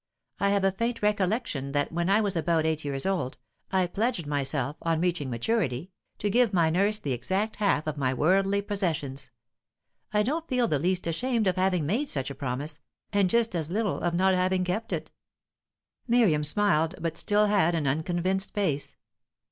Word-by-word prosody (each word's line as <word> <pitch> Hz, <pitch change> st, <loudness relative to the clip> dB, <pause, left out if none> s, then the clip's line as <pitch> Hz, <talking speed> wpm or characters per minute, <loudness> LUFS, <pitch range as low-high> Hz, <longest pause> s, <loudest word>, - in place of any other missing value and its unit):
I 200 Hz, -, +2 dB
have 200 Hz, -1 st, +2 dB
a 195 Hz, -, +4 dB
faint 230 Hz, +3 st, -2 dB
recollection 200 Hz, -, 0 dB
that 145 Hz, 0 st, 0 dB
when 170 Hz, +2 st, -1 dB
I 205 Hz, +3 st, +4 dB
was 200 Hz, -3 st, -1 dB
about 165 Hz, -1 st, +1 dB
eight 160 Hz, -1 st, 0 dB
years 140 Hz, -2 st, -3 dB
old, 185 Hz, -9 st, -1 dB, 0.3 s
I 190 Hz, -1 st, +2 dB
pledged 205 Hz, 0 st, -1 dB
myself, 145 Hz, -1 st, -2 dB
on 165 Hz, -1 st, 0 dB
reaching 170 Hz, -5 st, -1 dB
maturity, 140 Hz, -, -1 dB, 0.3 s
to 210 Hz, -, -2 dB
give 240 Hz, -1 st, +3 dB
my 165 Hz, -3 st, +3 dB
nurse 200 Hz, +5 st, +2 dB
the 145 Hz, -9 st, -4 dB
exact 190 Hz, -, -1 dB
half 200 Hz, -7 st, +1 dB
of 155 Hz, -1 st, -3 dB
my 130 Hz, -2 st, +1 dB
worldly 195 Hz, +8 st, +2 dB
possessions. 150 Hz, -10 st, -2 dB, 0.8 s
I 210 Hz, 0 st, +2 dB
don't 315 Hz, +8 st, -2 dB
feel 250 Hz, -2 st, +1 dB
the 150 Hz, -8 st, 0 dB
least 180 Hz, +4 st, 0 dB
ashamed 225 Hz, +7 st, 0 dB
of 185 Hz, -2 st, +2 dB
having 185 Hz, -4 st, +1 dB
made 235 Hz, -, 0 dB
such 135 Hz, -1 st, -2 dB
a -, -, -4 dB
promise, 140 Hz, +3 st, -4 dB, 0.3 s
and 200 Hz, -2 st, +3 dB
just 230 Hz, +1 st, +2 dB
as 160 Hz, -2 st, -2 dB
little 205 Hz, +2 st, -1 dB
of 175 Hz, -1 st, -1 dB
not 190 Hz, +2 st, +3 dB
having 185 Hz, 0 st, +1 dB
kept 215 Hz, +6 st, -2 dB
it." -, -, -3 dB, 1.0 s
Miriam 220 Hz, -11 st, +3 dB
smiled, 160 Hz, -1 st, +2 dB
but 165 Hz, -1 st, -2 dB
still 210 Hz, +4 st, +3 dB
had 195 Hz, -5 st, +3 dB
an 160 Hz, -3 st, -1 dB
unconvinced 175 Hz, +7 st, -1 dB
face. 155 Hz, -9 st, -1 dB
180 Hz, 180 wpm, -27 LUFS, 150-205 Hz, 1.0 s, a